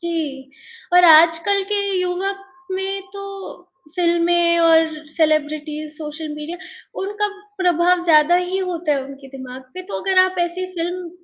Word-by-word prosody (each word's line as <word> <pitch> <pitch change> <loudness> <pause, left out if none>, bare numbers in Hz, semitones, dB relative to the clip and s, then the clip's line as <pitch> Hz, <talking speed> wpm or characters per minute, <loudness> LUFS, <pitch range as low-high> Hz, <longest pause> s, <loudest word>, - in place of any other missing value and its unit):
जी 305 -6 -4 0.4
और 360 0 +7
आजकल 330 +5 +6
के 410 - +3 0.2
युवक 375 +2 -2 0.3
में 385 +1 -3
तो 400 - -8 0.7
फ़िल्में 340 0 +2
और 325 -1 +5 0.2
सेलिब्रिटीज़ 305 -1 -1
सोशल 310 0 -7
मीडिया, 300 +3 -6 0.4
उनका 415 +1 -1 0.3
प्रभाव 355 0 +2
ज़्यादा 315 0 +5
ही 360 +1 -1
होता 350 -4 -2
है 275 -2 -1
उनके 275 0 -12
दिमाग़ 260 0 -9
पे, 370 - -6
तो 380 - -5
अगर 380 -1 +1
आप 370 0 +4
ऐसी 350 +2 -2
फ़िल्म 350 0 -4
340 Hz, 140 wpm, -20 LUFS, 310-365 Hz, 0.7 s, और